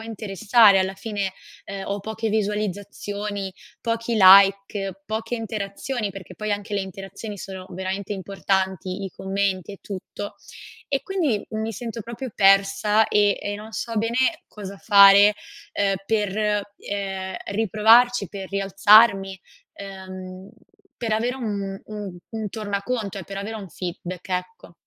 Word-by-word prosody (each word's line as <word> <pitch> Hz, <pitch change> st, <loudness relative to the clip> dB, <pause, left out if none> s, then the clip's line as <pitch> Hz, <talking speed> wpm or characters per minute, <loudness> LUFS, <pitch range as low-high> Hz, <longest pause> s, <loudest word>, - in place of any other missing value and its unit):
interessare 215 Hz, -1 st, +4 dB
alla 190 Hz, 0 st, 0 dB
fine?" 200 Hz, -2 st, -3 dB, 0.3 s
Ehm, 195 Hz, 0 st, -6 dB
ho 200 Hz, 0 st, -2 dB
poche 220 Hz, +2 st, -3 dB
visualizzazioni, 205 Hz, -1 st, -3 dB, 0.3 s
pochi 230 Hz, 0 st, -1 dB
like, 195 Hz, 0 st, +6 dB
poche 220 Hz, +3 st, -3 dB
interazioni, 215 Hz, +1 st, -3 dB
perché 195 Hz, -1 st, -10 dB
poi 215 Hz, -1 st, -2 dB
anche 205 Hz, +1 st, -4 dB
le 200 Hz, -, +1 dB
interazioni 195 Hz, +2 st, -7 dB
sono 190 Hz, -1 st, -8 dB
veramente 190 Hz, +2 st, -4 dB
importanti, 190 Hz, 0 st, -2 dB
i 190 Hz, -, -5 dB
commenti 195 Hz, 0 st, -2 dB
e 200 Hz, -, -11 dB
tutto; 205 Hz, +1 st, -7 dB, 0.5 s
e 275 Hz, -1 st, 0 dB
quindi 315 Hz, -, -1 dB
mi 220 Hz, +1 st, -3 dB
sento 230 Hz, +1 st, -6 dB
proprio 235 Hz, +2 st, -7 dB
persa, 200 Hz, +2 st, +4 dB
ehm 205 Hz, -1 st, +4 dB
e 205 Hz, -, -3 dB
non 215 Hz, +2 st, -10 dB
so 230 Hz, +1 st, -4 dB
bene 260 Hz, +10 st, 0 dB
cosa 200 Hz, -2 st, -9 dB
fare, 200 Hz, 0 st, +7 dB, 0.4 s
ehm, 195 Hz, -1 st, +1 dB
per, 210 Hz, -1 st, 0 dB, 0.2 s
ehm, 195 Hz, -2 st, -4 dB
riprovarci, 220 Hz, +2 st, +4 dB
per 195 Hz, -2 st, -7 dB
rialzarmi, 195 Hz, 0 st, +5 dB, 0.4 s
ehm, 190 Hz, -1 st, -9 dB, 0.5 s
per 230 Hz, -3 st, -2 dB
avere 240 Hz, +4 st, 0 dB
un 200 Hz, -5 st, -4 dB
un 205 Hz, -4 st, -7 dB
un 220 Hz, -2 st, -4 dB
tornaconto 205 Hz, 0 st, -3 dB
e 180 Hz, -, -7 dB
per 195 Hz, -, -8 dB
avere 220 Hz, +3 st, -5 dB
un 195 Hz, -3 st, -8 dB
feedback, 180 Hz, +1 st, -6 dB
ecco. 180 Hz, -1 st, -4 dB
200 Hz, 135 wpm, -23 LUFS, 195-220 Hz, 0.5 s, fare